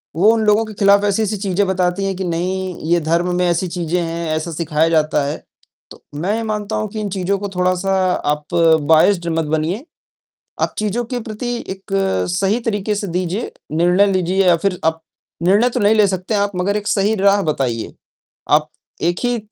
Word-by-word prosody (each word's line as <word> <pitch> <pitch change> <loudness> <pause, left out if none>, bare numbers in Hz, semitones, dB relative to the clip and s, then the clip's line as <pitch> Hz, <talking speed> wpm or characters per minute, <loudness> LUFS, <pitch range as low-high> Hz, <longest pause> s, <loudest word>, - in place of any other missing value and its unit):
वो 195 +7 +5
उन 225 -1 0
लोगों 210 +1 +4
के 215 - -9
खिलाफ 200 0 +4
ऐसी-ऐसी 210 +1 0
चीज़ें 200 0 0
बताती 185 0 0
हैं 195 -1 -1
कि 190 - -4
नहीं, 185 +2 -2 0.2
ये 175 - +4
धर्म 170 +3 0
में 180 0 +1
ऐसी 175 +1 0
चीज़ें 175 0 -2
हैं, 170 0 -3
ऐसा 160 +2 -3
सिखाया 160 0 0
जाता 155 -2 +2
है, 145 +2 -2 0.6
तो - - -14 0.2
मैं 195 +7 0
ये 230 - -2
मानता 215 -1 -3
हूँ 215 0 -1
कि 215 +2 -6
इन 205 - -3
चीज़ों 195 +1 -1
को 200 0 -4
थोड़ा-सा 185 +1 +1 0.4
आप 150 +2 -9 0.4
बायस्ड 170 +2 +4
मत 165 - 0
बनिए। 160 - -2 0.8
आप - - 0
चीज़ों 215 +3 -1
के 245 - -1
प्रति 220 +3 -5 0.2
एक 190 +1 -8 0.4
सही 200 +4 +1
तरीके 210 -2 -1
से 205 0 -3
दीजिए, 180 +5 -2 0.2
निर्णय 175 +5 +3
लीजिए 185 +1 +1
या 175 - +6
फिर 185 +2 -1
आप 160 0 +1 0.4
निर्णय 205 +7 +4
तो 245 - -2
नहीं 210 0 +4
ले 210 -2 +5
सकते 185 +2 -3
हैं 205 - +2
आप 205 0 0
मगर 200 +3 0
एक 210 0 -5
सही 205 +2 +2
राह 200 0 +3
बताइए, 120 -6 -3 0.6
आप - - +3 0.3
एक 175 +2 0
ही 245 0 +1
190 Hz, 195 wpm, -18 LUFS, 170-205 Hz, 0.8 s, या